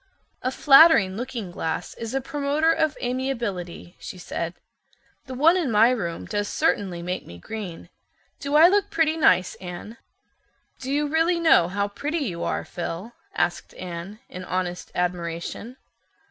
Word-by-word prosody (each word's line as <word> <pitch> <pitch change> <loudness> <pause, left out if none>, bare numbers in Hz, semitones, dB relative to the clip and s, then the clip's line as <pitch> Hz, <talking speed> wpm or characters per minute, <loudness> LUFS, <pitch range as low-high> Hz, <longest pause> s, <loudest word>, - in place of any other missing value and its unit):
"A 255 - 0
flattering 275 - +6
looking 235 -5 -5
glass 165 +1 -3
is 230 +2 -6
a 270 - +1
promoter 290 +4 +1
of 315 -2 +1
amiability," 235 -9 -3
she - - -8
said. 170 -1 -4 0.7
"The 260 - -6
one 315 +7 +5
in 345 -7 0
my 225 +2 +5
room 175 -9 -3
does 205 -1 -2
certainly 180 -5 0
make 180 +1 -4
me 85 - -10
green. 195 - -7 0.5
Do 285 +1 -2
I 320 +3 +9
look 400 +2 +2
pretty 320 -1 +2
nice, 185 - +3
Anne?" 180 +5 -8 0.8
"Do 265 +1 -5
you 295 +1 +1
really 325 +3 +2
know 320 - +5
how 200 +3 -1
pretty 290 +11 -3
you 170 -6 -4
are, - - -2
Phil?" 175 +5 -6 0.2
asked 175 0 -1
Anne, 180 +3 -7
in 185 - -8
honest 180 -1 -3
admiration. 175 +7 -3
220 Hz, 150 wpm, -24 LUFS, 180-280 Hz, 0.8 s, I